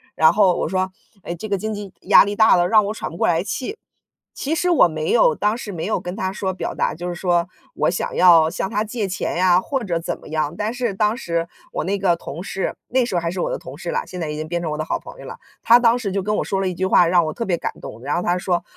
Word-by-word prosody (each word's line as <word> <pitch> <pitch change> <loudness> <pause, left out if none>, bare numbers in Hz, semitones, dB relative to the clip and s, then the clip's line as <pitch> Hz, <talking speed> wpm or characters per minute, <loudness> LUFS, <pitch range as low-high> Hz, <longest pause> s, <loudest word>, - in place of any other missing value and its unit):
"然 160 - +6
后 195 -4 +4
我 - - -1
说： 185 0 -1 0.3
“哎， 170 - -5
这 215 +6 -7
个 200 - +1
经 215 +3 -3
济 205 -2 -7
压 - - +7
力 205 0 -3
大 220 0 +6
了， 175 0 +3
让 215 -2 +5
我 210 - -2
喘 - - -5
不 170 - -9
过 - - +1
来 170 0 +2
气。” 260 - -4 0.6
其 305 +4 -2
实 360 +2 0
我 325 - +6
没 155 -1 -3
有 160 -9 +4
当 210 +3 0
时 205 -5 -7
没 160 - -4
有 215 - 0
跟 180 +2 -6
他 190 0 -2
说 190 -1 -3
表 - - -4
达 - - -1
就 175 +2 -5
是 - - -3
说 175 0 0 0.3
我 - - +1
想 180 - -3
要 165 -3 +6
向 180 +3 -3
他 210 - -1
借 220 -1 -3
钱 185 -2 -3
呀， 180 0 +4
或 265 +3 -3
者 170 -4 -1
怎 165 - -4
么 - - -14
样。 155 0 -1
但 215 +2 -2
是 245 -5 -2
当 210 +3 +1
时 170 -6 -2 0.3
我 - - -2
那 200 +3 -1
个 180 -3 +2
同 165 0 -8
事， 190 0 -3
那 255 -1 +2
时 215 - -5
候 175 - +2
还 170 - -2
是 185 - -3
我 - - -1
的 - - -2
同 - - -10
事 - - -5
啦， 475 0 -2
现 180 -1 -7
在 155 - -3
已 150 - -4
经 155 0 -4
变 170 +1 -2
成 160 -3 -3
我 150 - -3
的 155 - -3
好 - - -1
朋 - - -12
友 - - -10
啦。 - - -8 0.2
他 235 - +7
当 240 0 +3
时 200 -5 -3
就 195 -2 -1
跟 210 +1 -1
我 - - 0
说 195 -1 -1
了 190 - 0
一 - - -4
句 190 +2 -2
话， 180 -2 +5
让 175 -1 +3
我 155 - -3
特 230 - -4
别 175 -3 0
感 - - -4
动， 115 - -9
然 145 - -1
后 175 - -1
他 175 +1 +1
说： 180 -1 -1
185 Hz, 325 characters per minute, -21 LUFS, 170-210 Hz, 0.6 s, 压